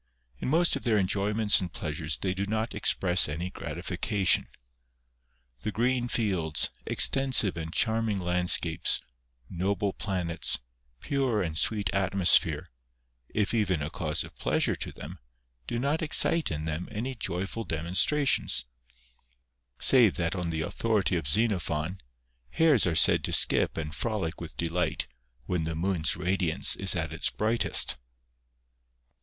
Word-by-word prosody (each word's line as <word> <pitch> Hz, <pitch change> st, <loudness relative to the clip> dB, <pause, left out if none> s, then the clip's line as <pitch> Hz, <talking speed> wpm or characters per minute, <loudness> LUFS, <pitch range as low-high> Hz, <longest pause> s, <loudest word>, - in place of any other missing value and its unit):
In -, -, -4 dB
most 165 Hz, +3 st, +3 dB
of 140 Hz, -, -4 dB
their 110 Hz, -3 st, +2 dB
enjoyments 105 Hz, +2 st, +2 dB
and 90 Hz, -3 st, -5 dB
pleasures 75 Hz, -1 st, -3 dB
they 95 Hz, -2 st, -2 dB
do 100 Hz, +1 st, -3 dB
not 110 Hz, +2 st, -2 dB
express 90 Hz, -4 st, +2 dB
any 85 Hz, +5 st, -4 dB
gratification. 90 Hz, +4 st, -1 dB, 1.1 s
The 105 Hz, -, -3 dB
green 120 Hz, +3 st, 0 dB
fields, 90 Hz, -11 st, 0 dB, 0.2 s
extensive 130 Hz, -7 st, +3 dB
and 80 Hz, -1 st, -6 dB
charming 110 Hz, 0 st, +1 dB
landscapes, 90 Hz, -2 st, +1 dB, 0.5 s
noble 95 Hz, +4 st, -2 dB
planets, 90 Hz, -, -2 dB, 0.4 s
pure 135 Hz, -6 st, 0 dB
and 80 Hz, -3 st, -3 dB
sweet 100 Hz, -1 st, 0 dB
atmosphere, 95 Hz, -1 st, +3 dB, 0.6 s
if 105 Hz, 0 st, -1 dB
even 95 Hz, -9 st, 0 dB
a 75 Hz, -, -5 dB
cause 80 Hz, -8 st, -2 dB
of -, -, -13 dB
pleasure -, -, 0 dB
to -, -, -5 dB
them, 85 Hz, +5 st, -8 dB, 0.5 s
do 120 Hz, -, -3 dB
not 140 Hz, +6 st, -1 dB
excite 160 Hz, +1 st, +2 dB
in 75 Hz, -1 st, -4 dB
them 80 Hz, +3 st, -4 dB
any 125 Hz, +5 st, -4 dB
joyful 95 Hz, 0 st, -4 dB
demonstrations; 90 Hz, -, +1 dB, 1.1 s
save 120 Hz, -7 st, +5 dB
that 85 Hz, +1 st, -1 dB
on 90 Hz, -2 st, -3 dB
the 80 Hz, -1 st, -2 dB
authority 105 Hz, +2 st, 0 dB
of 80 Hz, -4 st, -2 dB
Zenophon, 90 Hz, -3 st, 0 dB, 0.5 s
hares 155 Hz, -, +3 dB
are 85 Hz, -, 0 dB
said -, -, +5 dB
to -, -, -2 dB
skip -, -, +3 dB
and 75 Hz, -1 st, -4 dB
frolic 95 Hz, -4 st, -3 dB
with 85 Hz, -, -9 dB
delifi 85 Hz, 0 st, -1 dB
ht -, -, -6 dB, 0.4 s
when 85 Hz, 0 st, -2 dB
the 80 Hz, 0 st, -3 dB
moon's 85 Hz, -1 st, +1 dB
radiance 90 Hz, -1 st, +1 dB
is 95 Hz, 0 st, +3 dB
at 80 Hz, -2 st, -1 dB
its 80 Hz, -, 0 dB
bris^htest. 110 Hz, +2 st, +2 dB
95 Hz, 140 wpm, -28 LUFS, 85-110 Hz, 1.1 s, save